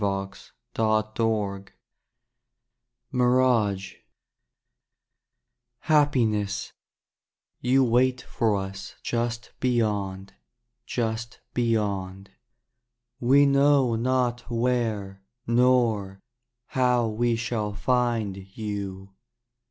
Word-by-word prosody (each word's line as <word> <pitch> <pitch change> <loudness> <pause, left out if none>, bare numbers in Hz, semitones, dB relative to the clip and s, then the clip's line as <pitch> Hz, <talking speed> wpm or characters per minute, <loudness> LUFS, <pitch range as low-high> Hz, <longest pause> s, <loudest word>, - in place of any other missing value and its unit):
DAY 100 -1 -1 0.8
DREAMS 105 -4 -1 1.5
MIRAGE 125 -7 +2 1.8
Happiness 115 -10 +1 0.4
— - - -59
you 130 +2 +3
wait 125 +1 +2
for 110 -3 0
us 95 0 -6
Just 120 0 -2
beyond, 105 -6 -1 0.5
Just 115 -1 -3
beyond. 100 -5 -1 0.9
We 135 +4 +5
know 140 -2 +4
not 120 0 0
where, 115 -5 -1 0.2
Nor 115 -5 +2 0.5
how 125 -2 +2
we 115 +2 0
shall 115 -2 -2
find 115 -3 0 0.2
you. 100 -3 -5
115 Hz, 70 wpm, -26 LUFS, 100-125 Hz, 1.8 s, We